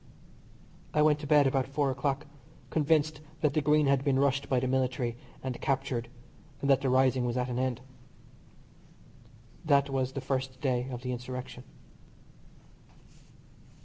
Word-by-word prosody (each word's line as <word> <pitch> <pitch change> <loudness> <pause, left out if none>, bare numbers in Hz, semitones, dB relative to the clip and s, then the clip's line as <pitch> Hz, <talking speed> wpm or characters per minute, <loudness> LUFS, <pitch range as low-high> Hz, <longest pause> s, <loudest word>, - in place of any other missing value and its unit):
I 150 - +5
went 150 -1 +4
to 150 - -6
bed 150 -1 +5
about 135 -1 +1
four 140 0 0
o'clock 140 +2 -2 0.5
convinced 155 -1 +1 0.2
that 150 -3 +2
the 155 - +2
Green 150 +1 +3
had 140 -1 +2
been 140 -2 +2
rushed 140 0 +1
by 130 - +3
the 130 - -2
military 125 -2 0 0.3
and 130 -2 -4
captured, 135 -4 -1 0.5
and 140 - -2
that 135 0 +4
the 135 - 0
rising 130 0 +3
was 120 0 -1
at 125 0 -1
an 125 0 -2
end. 130 -1 -1 1.8
That 140 -3 +3
was 130 -1 -1
the 135 - -3
first 130 -1 -3
day 125 -2 0
of 125 -1 -6
the 125 - -2
insurrection. 125 0 -6
135 Hz, 150 wpm, -29 LUFS, 125-140 Hz, 1.8 s, I